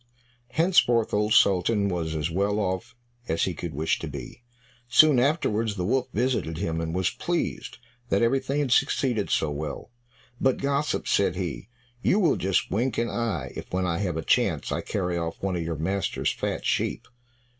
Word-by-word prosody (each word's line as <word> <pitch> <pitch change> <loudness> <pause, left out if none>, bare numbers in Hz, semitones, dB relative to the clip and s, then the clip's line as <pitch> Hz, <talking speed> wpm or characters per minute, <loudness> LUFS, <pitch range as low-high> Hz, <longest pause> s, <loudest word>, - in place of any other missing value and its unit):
Henceforth 155 -10 +3
Old 105 +1 +1
Sultan 100 +2 +4
was 85 -4 -2
as 75 +1 -2
well 100 +4 0
off 95 -1 -2 0.3
as 80 - 0
he 95 - 0
could 80 -2 -6
wish 80 +2 0
to - - -5
be. - - -8 0.5
Soon 140 +2 +6
afterwards 115 -6 +1
the 90 -3 -2
wolf 130 +5 +1
visited 115 -9 -1
him, 80 0 -2
and 80 +1 -3
was 95 0 +1
pleased 175 -1 -3 0.3
that 100 +1 +2
everything 135 +4 +1
had 135 -4 -1
succeeded 125 -5 +2
so 80 - +1
well. 75 +8 -5 0.5
"But, 130 -1 +2
gossip," 140 +2 -1
said 95 -3 +2
he, 90 - -4 0.3
"you 190 - +3
will 170 -7 +3
just 95 0 0
wink 120 +5 0
an 115 0 0
eye 105 - -2
if - - -8
when 90 0 0
I 85 -2 -1
have 90 -5 -1
a 80 - -3
chance, - - +1
I - - -1
carry 90 -3 -2
off 85 0 -4
one 95 -2 0
of 85 - -2
your 80 -1 -3
master's 95 +6 -1
fat - - -3
sheep." - - -1
100 Hz, 180 wpm, -26 LUFS, 85-125 Hz, 0.5 s, Soon